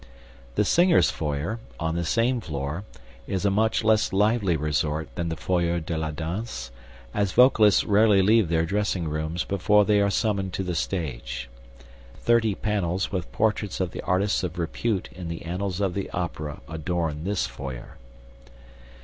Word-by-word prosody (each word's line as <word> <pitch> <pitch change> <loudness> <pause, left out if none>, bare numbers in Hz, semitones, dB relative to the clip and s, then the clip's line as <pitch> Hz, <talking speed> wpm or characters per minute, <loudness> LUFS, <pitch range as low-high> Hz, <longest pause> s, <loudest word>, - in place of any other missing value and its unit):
The - - +2
singers' 175 0 +4
foyer, 75 +8 -3 0.2
on 80 -1 -1
the 85 +1 -1
same 115 +8 +1
floor, 75 +3 -4 0.4
is 95 0 -2
a 100 - +3
much 110 +3 +1
less 110 0 +3
lively 100 -3 +2
resort 75 +1 -1
than 85 -1 -2
the 80 - -2
foyer 85 0 0
de 80 +1 -4
la 80 0 -2
danse, 80 - -5 0.4
as 100 -2 0
vocalists 110 -5 +6
rarely 105 -2 +4
leave 110 -2 +4
their 80 -1 +2
dressing 100 -2 -1
rooms 80 +3 -2
before 105 +2 +3
they 105 -1 +3
are 100 - +3
summoned 100 -2 0
to 95 - -2
the 90 -1 -2
stage. - - -3 0.7
Thirty 110 +5 +2
panels 95 -4 -1
with 90 -4 -3
portraits 105 -3 0
of 90 -2 -1
the - - -6
artists 95 +3 +1
of 90 -1 -4
repute 95 +4 -1
in 90 -1 -8
the 85 0 -5
annals 90 +2 -3
of 95 -3 0
the 100 0 -3
Opera 80 -4 -4
adorn 80 -1 -2
this 100 +1 0
foyer. 65 0 -8
90 Hz, 160 wpm, -25 LUFS, 80-105 Hz, 0.7 s, vocalists